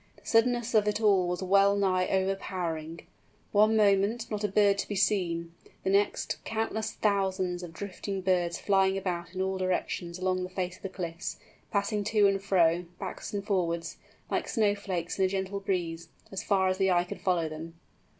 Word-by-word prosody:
The -, -, -22 dB
suddenness 240 Hz, 0 st, +2 dB
of 210 Hz, -2 st, +4 dB
it 210 Hz, 0 st, +1 dB
all 200 Hz, -5 st, +4 dB
was 180 Hz, +1 st, -2 dB
well 200 Hz, +1 st, +4 dB
nigh 185 Hz, -2 st, +2 dB
overpowering. 180 Hz, -4 st, -2 dB, 0.5 s
One 215 Hz, +2 st, +4 dB
moment, 210 Hz, +3 st, +2 dB
not 210 Hz, 0 st, -2 dB
a -, -, +3 dB
bird 200 Hz, 0 st, +3 dB
to -, -, -2 dB
be 205 Hz, -, -3 dB
seen; 175 Hz, -4 st, 0 dB, 0.3 s
the 190 Hz, -, +1 dB
next, 200 Hz, +1 st, 0 dB
countless 220 Hz, 0 st, -2 dB
thousands 190 Hz, -3 st, 0 dB
of 175 Hz, -2 st, -7 dB
drifting 195 Hz, +2 st, -5 dB
birds 180 Hz, -2 st, +1 dB
flying 195 Hz, -1 st, +2 dB
about 175 Hz, -2 st, -4 dB
in 185 Hz, -, -1 dB
all 190 Hz, 0 st, -2 dB
directions 180 Hz, -1 st, -2 dB
along 185 Hz, 0 st, 0 dB
the 180 Hz, -, -4 dB
face 185 Hz, -1 st, -3 dB
of -, -, -25 dB
the 195 Hz, -, -4 dB
cliffs, 170 Hz, -3 st, -5 dB, 0.3 s
passing 205 Hz, +1 st, 0 dB
to 210 Hz, -1 st, +3 dB
and 195 Hz, -1 st, +2 dB
fro, 175 Hz, -3 st, +3 dB
backwards -, -, -6 dB
and 200 Hz, -1 st, -3 dB
forwards, 170 Hz, -4 st, -1 dB, 0.3 s
like -, -, 0 dB
snow 215 Hz, -4 st, +2 dB
flakes 190 Hz, -4 st, -4 dB
in 190 Hz, -, +4 dB
a -, -, +3 dB
gentle 190 Hz, +1 st, -2 dB
breeze, 170 Hz, -4 st, -2 dB, 0.4 s
far 190 Hz, -2 st, +3 dB
as 185 Hz, +1 st, 0 dB
the 190 Hz, 0 st, +3 dB
eye 175 Hz, -1 st, +3 dB
could 180 Hz, -, -8 dB
follow 175 Hz, -4 st, +1 dB
them! 160 Hz, +2 st, -8 dB
190 Hz, 185 wpm, -29 LUFS, 180-200 Hz, 0.5 s, of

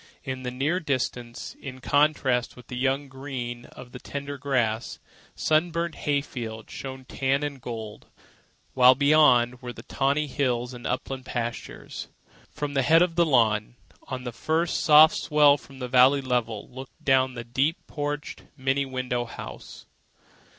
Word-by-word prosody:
In 130 Hz, -1 st, -4 dB
the 125 Hz, -, -3 dB
near 140 Hz, +8 st, 0 dB
distance, 125 Hz, -6 st, -3 dB
in 130 Hz, -1 st, -8 dB
contrast 135 Hz, -3 st, +1 dB
with 125 Hz, -2 st, -15 dB
the 125 Hz, -, -5 dB
young 135 Hz, +3 st, 0 dB
green 130 Hz, -3 st, -6 dB
of 125 Hz, -1 st, -13 dB
the 125 Hz, -, -9 dB
tended 140 Hz, +1 st, -6 dB
grass, 120 Hz, -5 st, -1 dB, 0.4 s
sunburnt 170 Hz, +1 st, +1 dB
hay 145 Hz, -1 st, 0 dB
fields 110 Hz, -5 st, -7 dB
showed 130 Hz, -1 st, -7 dB
tan 135 Hz, +2 st, 0 dB
and 140 Hz, -3 st, -4 dB
gold; 110 Hz, -3 st, -7 dB, 0.7 s
while 130 Hz, 0 st, +7 dB
beyond 130 Hz, -4 st, +4 dB
were 125 Hz, -1 st, -6 dB
the 115 Hz, -1 st, -11 dB
tawny 140 Hz, +3 st, 0 dB
hills 125 Hz, -3 st, -1 dB
and 120 Hz, -1 st, -7 dB
upland 130 Hz, +1 st, -4 dB
pastures. 120 Hz, -1 st, -5 dB, 0.4 s
From 145 Hz, -1 st, -4 dB
the 135 Hz, -, +2 dB
head 165 Hz, +6 st, +5 dB
of 180 Hz, -2 st, -1 dB
the 170 Hz, 0 st, +3 dB
lawn, 115 Hz, -5 st, +2 dB, 0.3 s
on 130 Hz, -1 st, -5 dB
the 120 Hz, -, -4 dB
first 160 Hz, +8 st, 0 dB
soft 155 Hz, 0 st, +7 dB
swell 150 Hz, -2 st, +5 dB
from 140 Hz, -1 st, -13 dB
the 125 Hz, -1 st, -4 dB
valley 130 Hz, +3 st, +5 dB
level, 120 Hz, -5 st, -2 dB
looked 130 Hz, +1 st, -11 dB
down 130 Hz, -1 st, +3 dB
the 120 Hz, -, -5 dB
deep 135 Hz, +8 st, 0 dB
porched, 145 Hz, 0 st, -4 dB, 0.2 s
many 135 Hz, +1 st, 0 dB
windowed 125 Hz, -2 st, -2 dB
house. -, -, -9 dB
130 Hz, 155 wpm, -26 LUFS, 125-145 Hz, 0.7 s, while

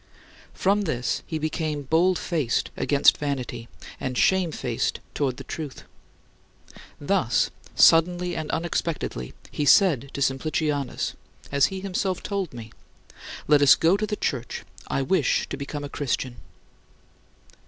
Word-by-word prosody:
From 200 Hz, +2 st, +2 dB
this 125 Hz, -7 st, -1 dB
he 160 Hz, -, -2 dB
became 155 Hz, -1 st, -2 dB
bold 165 Hz, +6 st, +3 dB
faced 155 Hz, -11 st, -1 dB
against 140 Hz, -1 st, +4 dB
vanity 125 Hz, -5 st, -3 dB, 0.3 s
and 130 Hz, -1 st, -3 dB
shamefaced 185 Hz, -5 st, +1 dB
toward 135 Hz, -4 st, -1 dB
the -, -, -8 dB
truth. 150 Hz, -5 st, -7 dB, 1.2 s
Thus, -, -, +1 dB, 0.2 s
suddenly 175 Hz, +2 st, +5 dB
and 155 Hz, -1 st, -4 dB
unexpectedly, 165 Hz, -, -3 dB, 0.2 s
he 150 Hz, -, -2 dB
said 145 Hz, -, +5 dB
to 140 Hz, -, -4 dB
Simplicianus 145 Hz, +1 st, -1 dB, 0.4 s
as 140 Hz, -1 st, +4 dB
he 190 Hz, -1 st, -6 dB
himself 190 Hz, -1 st, -2 dB
told 195 Hz, -5 st, -2 dB
me 115 Hz, -2 st, -9 dB, 0.8 s
"Let 150 Hz, -1 st, +5 dB
us 145 Hz, -, +8 dB
go 165 Hz, +4 st, +3 dB
to 215 Hz, +1 st, -1 dB
the 210 Hz, -, -2 dB
church; 125 Hz, -, -3 dB, 0.2 s
I 135 Hz, -, 0 dB
wish 155 Hz, -1 st, +1 dB
to -, -, -3 dB
become 145 Hz, +1 st, -5 dB
a -, -, -4 dB
Christian." 130 Hz, -3 st, -2 dB
150 Hz, 130 wpm, -25 LUFS, 135-175 Hz, 1.2 s, us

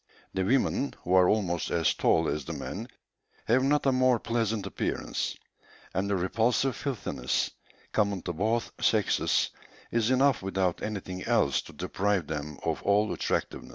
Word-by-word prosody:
The 95 Hz, -, 0 dB
women, 135 Hz, +5 st, +1 dB
who 90 Hz, -, -1 dB
are 90 Hz, -1 st, +6 dB
almost 90 Hz, -6 st, 0 dB
as 85 Hz, -2 st, +2 dB
tall -, -, +2 dB
as 75 Hz, -, -1 dB
the -, -, -5 dB
men, -, -, -5 dB, 0.6 s
have 125 Hz, +3 st, +3 dB
not 145 Hz, +2 st, +2 dB
a 135 Hz, -, +5 dB
more 130 Hz, -1 st, +4 dB
pleasant 115 Hz, -3 st, -1 dB
appearance; -, -, -2 dB, 0.6 s
and 95 Hz, +2 st, -1 dB
the 100 Hz, -, +2 dB
repulsive 115 Hz, +8 st, +1 dB
filthiness, 100 Hz, -, -2 dB, 0.4 s
common 100 Hz, -4 st, +1 dB
to 90 Hz, -, -3 dB
both 110 Hz, +7 st, 0 dB
sexes, -, -, +2 dB, 0.4 s
is 115 Hz, -1 st, +1 dB
enough 130 Hz, 0 st, +3 dB
without 95 Hz, -2 st, -1 dB
anything 95 Hz, -3 st, -4 dB
else 115 Hz, -, +2 dB
to -, -, -13 dB
deprive 100 Hz, -3 st, 0 dB
them 75 Hz, -1 st, -5 dB
of -, -, -1 dB
all 105 Hz, +1 st, +2 dB
attractiveness." -, -, -2 dB
105 Hz, 155 wpm, -28 LUFS, 90-120 Hz, 0.6 s, are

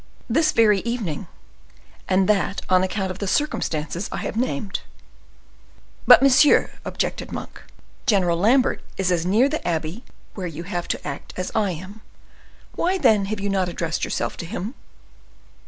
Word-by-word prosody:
"This 310 Hz, +7 st, +2 dB
very 210 Hz, -3 st, +4 dB
evening, 220 Hz, -9 st, -3 dB, 0.8 s
and 185 Hz, 0 st, +3 dB
that 200 Hz, -1 st, +1 dB
on 185 Hz, 0 st, +5 dB
account 190 Hz, 0 st, -1 dB
of 185 Hz, -, -8 dB
the 200 Hz, -, -3 dB
circumstances 175 Hz, -, -1 dB
I -, -, -3 dB
have -, -, -4 dB
named." 205 Hz, -, -2 dB, 1.3 s
"But, -, -, +9 dB
monsieur," 275 Hz, +2 st, +5 dB
objected -, -, -3 dB
Monk, -, -, -7 dB, 0.5 s
"General 180 Hz, -7 st, +3 dB
Lambert 250 Hz, +7 st, +3 dB, 0.2 s
is 185 Hz, -1 st, +1 dB
as 175 Hz, -1 st, 0 dB
near 220 Hz, +8 st, +4 dB
the 310 Hz, +2 st, -2 dB
abbey 165 Hz, +6 st, -2 dB, 0.3 s
where 185 Hz, -3 st, -4 dB
you 165 Hz, 0 st, -6 dB
have 175 Hz, -1 st, -4 dB
to -, -, -3 dB
act 140 Hz, -1 st, -7 dB
as 185 Hz, 0 st, -3 dB
I 210 Hz, -3 st, +1 dB
am. 190 Hz, +6 st, -10 dB, 0.7 s
Why, 370 Hz, +3 st, +1 dB
then, 220 Hz, -, +4 dB
have 210 Hz, +1 st, -3 dB
you 200 Hz, 0 st, -2 dB
not 190 Hz, -2 st, 0 dB
addressed 165 Hz, -1 st, -3 dB
yourself -, -, -2 dB
to -, -, -5 dB
him?" 205 Hz, +4 st, -5 dB
195 Hz, 155 wpm, -23 LUFS, 175-225 Hz, 1.3 s, But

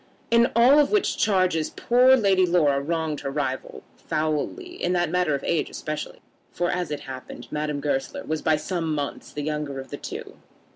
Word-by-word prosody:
In 235 Hz, +1 st, +5 dB
all 250 Hz, +5 st, +7 dB
of 290 Hz, -, +4 dB
which 420 Hz, -2 st, +2 dB
charges 185 Hz, -6 st, +2 dB
poor 250 Hz, +2 st, +4 dB
Lady 195 Hz, -5 st, +3 dB
Laura 155 Hz, -6 st, +3 dB
wronged 160 Hz, 0 st, -2 dB
her 140 Hz, -, -4 dB
rival 130 Hz, -, -3 dB
foully; 155 Hz, -, -2 dB
in 180 Hz, -, +1 dB
that 175 Hz, -1 st, +1 dB
matter 180 Hz, -5 st, +2 dB
of 140 Hz, -, -5 dB
age 165 Hz, -3 st, 0 dB
especially, 155 Hz, 0 st, -6 dB, 0.3 s
for, 175 Hz, 0 st, -1 dB
as 180 Hz, -2 st, -2 dB
it 150 Hz, -1 st, -4 dB
happened, 130 Hz, -2 st, -9 dB
Madame 150 Hz, -1 st, -2 dB
Goesler 135 Hz, -2 st, -2 dB
was 155 Hz, 0 st, -3 dB
by 155 Hz, -, +3 dB
some 165 Hz, -1 st, -2 dB
months 145 Hz, -1 st, -4 dB
the 145 Hz, -, -5 dB
younger 150 Hz, -2 st, -3 dB
of 135 Hz, -, -9 dB
the -, -, -4 dB
two. -, -, -8 dB
155 Hz, 185 wpm, -25 LUFS, 145-185 Hz, 0.3 s, all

